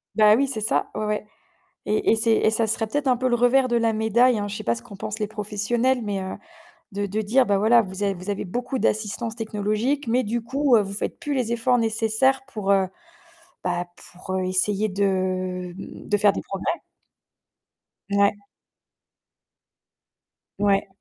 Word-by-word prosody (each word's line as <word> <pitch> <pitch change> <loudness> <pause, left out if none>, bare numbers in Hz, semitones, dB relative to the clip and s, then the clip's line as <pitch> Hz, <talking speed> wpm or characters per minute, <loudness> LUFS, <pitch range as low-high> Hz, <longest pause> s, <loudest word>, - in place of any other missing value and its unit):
Bah 215 -1 +6
oui, 275 +4 +2
c'est 230 -5 -4
ça. 215 - 0
Ouais, 215 - -2
ouais. 210 0 -2 0.6
Et 215 - +1
et - - +3
c'est 225 0 +2
et - - +3
ça 225 +1 +1
serait 220 +1 -1
peut-être 290 +5 -2
un 255 -1 +4
peu 255 +1 0
le 240 - +2
revers 250 +2 +3
de 240 - +1
la 230 -1 +2
médaille, 220 +2 +3
hein. 205 0 -2
Je 205 - -5
sais - - -7
pas 115 - +2
ce 120 - -9
qu'en 200 - -12
pensent 215 +3 -5
les 210 - -1
professionnels, 220 +4 0
mais 205 -2 -2
heu, 190 - -5 0.6
de 205 +1 -1
de 210 +2 -2
dire: 245 +5 +3
«Bah 200 -2 +2
voilà, 225 +4 +5
vous 190 -1 -7
a 200 - +1
vous 185 +2 -8
avez 200 -1 -2
beaucoup 245 +7 -3
d'assistance 220 +2 -1
technologique, 225 +5 -1
mais 245 +3 +2
du 230 +3 -2
coup, 265 +2 +2
heu, 215 - +4
vous 195 0 -5
faites 200 - -4
plus 295 -4 -3
les 250 -4 -1
efforts 235 +2 +2
nécessaires 225 +4 +1
pour, 210 -7 -2
heu, 195 -1 +3 0.8
bah 175 -1 -1 0.3
pour, 180 +1 -9
heu, 185 -1 0
essayer 200 +3 +1
de, 185 -2 -1
mmh, 195 - -10
de 205 - +3
faire 205 -1 +4
des - - -4
progrès». 195 -1 -3 1.4
Ouais. 200 0 +4 2.3
Ouais. 200 -1 +2
215 Hz, 190 wpm, -24 LUFS, 200-240 Hz, 2.3 s, Bah